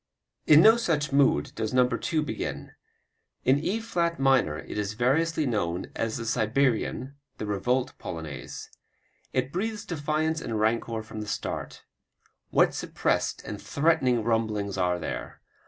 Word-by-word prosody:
In 155 +1 +8
no 225 +4 +8
such 155 -10 0
mood 135 - +3
does 110 +2 -3
No. 125 -1 +5
2 155 +4 -1
begin. 150 - -4 0.7
In 130 +2 +4
E 195 +9 -1
flat 170 -8 -1
minor 135 - +3
it - - -6
is 105 0 -2
variously 150 +7 +2
known 95 -8 -2
as 115 -1 -1
the 115 - -5
Siberian, 120 +3 0 0.2
the - - -4
Revolt 120 +6 0
Polonaise. 80 -6 -7 0.6
It 130 +1 -1
breathes 215 +3 -2
defiance 160 -2 -1
and 115 -6 -3
rancor 110 0 0
from 110 0 -7
the 105 - -6
start. - - -4 0.7
What - - +4
suppressed - - -1
and - - -6
threatening 135 -6 +2
rumblings 110 -3 0
are 90 -2 +1
there! 85 - -5
125 Hz, 140 wpm, -27 LUFS, 110-155 Hz, 0.7 s, In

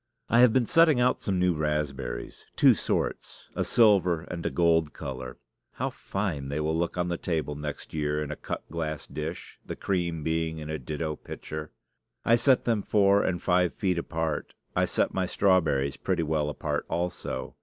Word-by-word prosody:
I 115 - +4
have 125 -2 +7
been 125 0 +3
setting 160 -1 +5
out 125 +1 +3
some 95 -3 -1
new 90 0 +3
raspberries, 75 -5 -3
two - - +7
sorts - - -3
a - - 0
silver 95 -7 +4
and 85 -1 -6
a - - 0
gold 80 -3 +2
color. 65 -3 -6 0.4
How - - -2
fine 90 -9 -3
they 70 +2 -2
will 80 +1 0
look 85 +1 -1
on 90 0 0
the 85 -1 -2
table 80 -4 -1
next 75 0 -6
year 75 -1 0
in 75 - -5
a - - -3
cut - - -6
glass 80 -3 -3
dish, 80 +3 -6
the - - -6
cream 85 -5 -1
being 80 0 -1
in 75 0 -6
a 80 - -3
ditto 75 +4 -3
pitcher! 75 0 -7 0.6
I 115 - +6
set 125 +2 +3
them 115 -3 +1
four 100 -1 +4
and 90 -2 0
five 90 -1 +2
feet 90 -4 0
apart. 80 -2 -3 0.2
I - - +3
set - - 0
my 95 -1 0
strawberries 80 -9 +2
pretty 90 -3 0
well 75 -1 0
apart 75 - -3
also. 90 +1 -3
80 Hz, 185 wpm, -27 LUFS, 75-95 Hz, 0.6 s, have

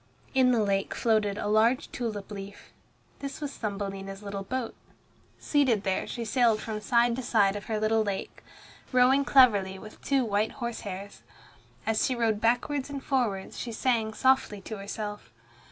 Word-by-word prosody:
In 260 -2 +4
the 230 -3 +3
lake 195 -1 0
floated 215 -3 +1
a 205 - -3
large 220 +4 +2
tulip 215 -4 -4
leaf. 200 0 -9 0.5
This 275 -1 -6
was 290 -2 -4
Thumbelina's 195 -1 -5
little 200 -1 -4
boat. 245 +4 -3 0.6
Seated 260 -8 +2
there 190 -1 -1
she 235 -2 -4
sailed 230 -1 +3
from 215 -1 -5
side 235 +1 +3
to - - -2
side 205 -5 +2
of 205 - -6
her 220 -1 -2
little 220 +1 +2
lake, 200 -2 -5 0.5
rowing 255 +2 +5
cleverly 205 -9 +5
with 215 +2 -12
two 270 -3 +1
white 210 0 0
horse 235 -2 -4
hairs. 200 0 -7 0.6
As 220 0 +1
she 255 - +1
rowed 225 -3 0
backwards 255 +4 +1
and 280 -1 -6
forwards 225 -8 -1
she 240 - -4
sang 225 -2 0
softly 260 -6 +2
to 220 +2 -7
herself. 205 +1 -6
220 Hz, 165 wpm, -28 LUFS, 205-250 Hz, 0.6 s, rowing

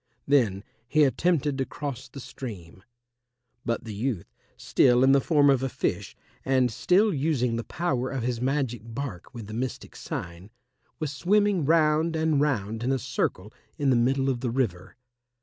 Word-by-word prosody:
Then 110 -9 +2 0.2
he 155 +4 +4
attempted 145 -1 +1
to 135 - +1
cross 140 -4 -6
the 140 - -9
stream. 95 -10 -9 0.8
But 115 -1 -2
the 110 -2 -7
youth, 105 - -3 0.2
still 125 0 +3
in 135 - +6
the 140 0 +5
form 145 -1 +3
of 135 -2 +4
a 135 - -1
fish - - -3 0.3
and 130 -2 +2
still 195 - +3
using 135 -5 0
the 115 - -3
power 130 -4 -2
of 135 -3 -3
his 120 -1 -2
magic 130 -4 -1
bark 115 -5 -6
with 115 -3 -7
the 110 - -9
mystic 125 +3 -4
sign, 85 +3 -6 0.5
was 155 -3 -3
swimming 195 +2 +2
round 160 +1 +3
and 160 -2 +2
round 115 -7 -1
in 125 +3 0
a 135 - +2
circle 115 -6 -3 0.2
in 140 -3 +2
the - - +4
middle 135 +3 +2
of 130 -3 0
the 125 - -2
river. 115 -8 -2
130 Hz, 170 wpm, -26 LUFS, 115-145 Hz, 0.8 s, in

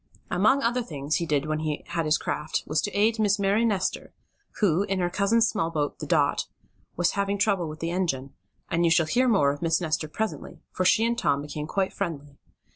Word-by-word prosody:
Among 240 +10 +3
other 240 +2 +1
things 150 - -2
he 170 - -3
did 145 -2 +1
when 155 0 -1
he 155 -2 -3
had 165 -2 -1
his 155 0 +3
craft, 150 +1 -3
was 155 0 0
to 205 - -3
aid 220 +2 +2
a - - +2
Miss 205 0 +3
Mary 200 +3 +2
Nestor, 200 -5 -1 0.5
who, 185 -4 +3
in 195 -1 -1
her 175 -1 0
cousin's 220 +4 +3
small 200 -8 -1
boat, 150 -3 -2
the - - -6
Dot, - - +1 0.5
was 175 0 +2
having 200 0 -1
trouble 195 -5 +1
with 155 +1 -9
the 165 +1 -2
engine, 150 -7 -2 0.3
and 170 +1 0
you 170 - +4
shall 165 -1 +4
hear 250 +11 +2
more 170 - +4
of 145 - -7
Miss 165 -1 +2
Nestor 155 -2 -1
presently, 220 +8 -4
for 185 - -2
she 225 +4 +4
and 235 +1 +1
Tom 145 -12 0
became 150 0 -5
quite 190 +2 -1
friendly. 145 -7 -5
175 Hz, 220 wpm, -26 LUFS, 155-205 Hz, 0.5 s, you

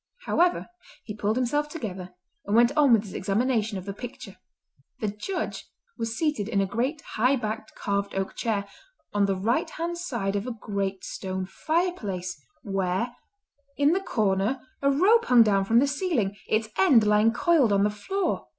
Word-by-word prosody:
However, 355 +1 +2 0.4
he 210 - -6
pulled 210 +1 -1
himself 290 +4 0
together, 190 - -6 0.3
and 205 - +1
went 240 +4 +5
on 295 -4 +5
with 225 -3 +5
his 195 -4 -10
examination 215 +1 0
of 185 - -7
the 200 - -4
picture. 245 +4 -9 0.6
The 215 - -1
Judge 210 - -4 0.3
was 230 0 -3
seated 295 -10 0
in 205 -4 +1
a 195 - +2
great 250 +10 -2
high 250 +3 +1
backed 220 -2 -5
carved 200 -1 -2
oak 195 0 -2
chair, 205 -3 -1 0.5
on 205 -1 +2
the 195 - +1
right 215 +6 0
hand 340 +1 -4
side 235 - -2
of 200 +4 -2
a 250 - -3
great 195 -2 -3
stone 190 0 -4
fireplace 205 - -2 0.3
where, 195 +4 -1 0.6
in 285 +1 +4
the 375 +3 +1
corner, 215 - 0
a 280 - +3
rope 395 +12 +4
hung 245 -2 +7
down 200 -3 +2
from 225 +4 +3
the 260 - +6
ceiling, 280 - -1
its 215 0 0
end 265 - +6
lying 210 +2 +4
coiled 275 -2 +3
on 200 0 +3
the 210 - +2
floor. 365 - -2
220 Hz, 175 wpm, -26 LUFS, 200-280 Hz, 0.6 s, hung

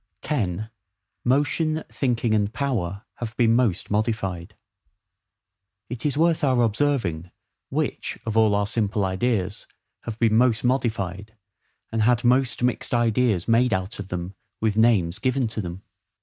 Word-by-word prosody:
10. 110 - -2 0.5
Motion, 155 +4 +1
Thinking, 120 -4 0
and 105 -1 +1
Power 110 -8 -2
have 120 0 -6
been 115 -2 +4
most 115 -8 +1
modified. 105 -5 -2 1.4
It 125 +3 -1
is 145 - -2
worth 165 0 +2
our 130 -3 +3
observing, 110 - 0 0.4
which - - -2
of 110 -1 -3
all 110 -2 +4
our 100 0 +1
simple 105 -1 0
ideas 95 +1 -1 0.4
have 115 -2 -5
been 115 -2 +3
MOST 115 -1 +3
modified, 110 -5 -1 0.5
and 115 0 0
had 120 +2 +3
most 125 0 +2
mixed 125 0 0
ideas 115 -5 +2
made 115 0 +3
out 95 +4 -3
of 100 - -5
them, 90 0 -5 0.3
with 110 -2 0
names 105 -6 +3
given 130 -1 +1
to 110 0 -3
them. 90 +1 -7
115 Hz, 140 wpm, -24 LUFS, 100-125 Hz, 1.4 s, been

